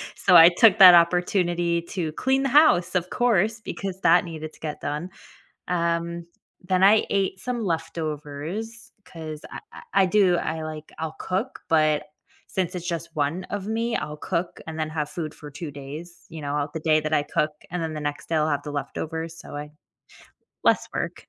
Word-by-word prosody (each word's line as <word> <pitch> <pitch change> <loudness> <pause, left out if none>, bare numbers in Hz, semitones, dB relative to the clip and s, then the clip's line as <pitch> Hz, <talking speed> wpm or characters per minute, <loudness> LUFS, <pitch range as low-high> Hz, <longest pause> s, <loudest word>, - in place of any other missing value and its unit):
so 180 -2 +3
I 165 +1 +10
took 220 -1 +6
that 185 -3 +11
opportunity 175 0 +2
to 165 -5 -3
clean 265 +6 +1
the 270 - +1
house, 240 - +5
of 180 0 0
course, 225 -2 +1
because 195 -2 -5
that 175 +2 +5
needed 155 -2 -7
to - - -20
get 150 -2 -5
done. 150 +5 -3 0.6
Um, 170 -1 -1 0.4
then 185 0 +2
I 210 +2 +5
ate 190 -1 -1
some 245 -3 -3
leftovers 165 - -4 0.2
'cause 155 -3 -8
I - - -7
I - - -11 0.2
I - - +4
do 185 -2 +3
I, 160 -1 -3
like 155 0 -7
I'll 160 0 -4
cook, 195 +8 -3
but 155 -2 +3 0.5
since 185 -1 -2
it's 175 -1 -5
just 170 -1 -3
1 155 +5 -1
of 205 0 -5
me, 230 +2 -1
I'll 150 0 -5
cook 170 +1 -3
and 160 0 -6
then 155 0 -2
have 150 -2 -2
food 155 -2 -5
for 150 -1 -11
2 150 +1 -7
days, 145 +5 -10
you 160 -2 -9
know, 145 +1 -2
the 160 - -3
day 155 -1 +3
that 155 0 -1
I 145 - +3
cook, 150 +1 -1 0.2
and 175 -1 -3
then 160 -1 -3
the 150 - -5
next 145 0 -4
day, 165 - -1
I'll 155 0 +2
have 145 -1 -1
the 145 - -6
leftovers, 160 +3 -5
so, - - -9
I 150 0 -6 1.0
less - - +3
work. - - -4
170 Hz, 190 wpm, -24 LUFS, 155-185 Hz, 1.0 s, that